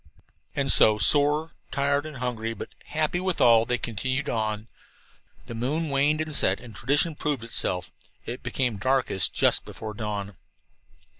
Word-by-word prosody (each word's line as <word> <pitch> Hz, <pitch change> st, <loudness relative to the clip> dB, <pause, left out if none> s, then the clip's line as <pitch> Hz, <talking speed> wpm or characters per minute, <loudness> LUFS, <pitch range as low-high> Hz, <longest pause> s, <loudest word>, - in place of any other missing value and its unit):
And 140 Hz, -1 st, +3 dB
so, 105 Hz, -1 st, +7 dB
sore, 150 Hz, +6 st, +3 dB, 0.2 s
tired 140 Hz, +2 st, 0 dB
and 150 Hz, -3 st, -9 dB
hungry, 115 Hz, -2 st, -3 dB
but -, -, -8 dB, 0.2 s
happy 155 Hz, +3 st, -1 dB
withal, 120 Hz, -12 st, +3 dB
they 125 Hz, +1 st, 0 dB
continued 130 Hz, +5 st, -3 dB
on. 110 Hz, -1 st, -3 dB, 0.8 s
The 120 Hz, -, -8 dB
moon 145 Hz, +7 st, -2 dB
waned 145 Hz, +3 st, +2 dB
and 155 Hz, -1 st, -4 dB
set, 95 Hz, -8 st, +2 dB
and 115 Hz, -4 st, -13 dB
tradition 145 Hz, -, +1 dB
proved 145 Hz, -4 st, -3 dB
itself 90 Hz, -7 st, -1 dB, 0.3 s
it 120 Hz, +2 st, -6 dB
became 125 Hz, -5 st, -2 dB
darkest 130 Hz, -3 st, +1 dB
just -, -, +2 dB
before 110 Hz, -1 st, -8 dB
dawn. 105 Hz, -2 st, -5 dB
125 Hz, 145 wpm, -25 LUFS, 110-145 Hz, 0.8 s, so